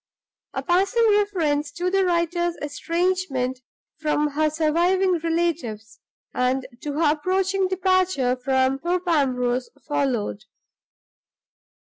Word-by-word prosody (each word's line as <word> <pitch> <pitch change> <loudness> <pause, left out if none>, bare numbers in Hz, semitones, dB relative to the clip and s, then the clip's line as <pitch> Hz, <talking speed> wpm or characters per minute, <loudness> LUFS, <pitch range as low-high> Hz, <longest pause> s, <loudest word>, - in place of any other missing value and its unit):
A - - -2
passing 395 +7 +2
reference 330 -9 +1
to 355 +2 -2
the 390 0 +3
writer's 345 -1 0
estrangement 295 -4 -1 0.4
from 300 -1 +1
her 305 +2 +1
surviving 340 +4 +2
relatives, 320 -10 -2 0.3
and 255 +1 0 0.2
to 295 - -4
her 300 0 +3
approaching 375 +4 0
departure 370 -8 +1
from 260 +1 +1
Thorpe 355 +3 -2
Ambrose, 255 -6 +1 0.2
followed. 245 -7 -1
320 Hz, 100 wpm, -23 LUFS, 270-365 Hz, 0.4 s, the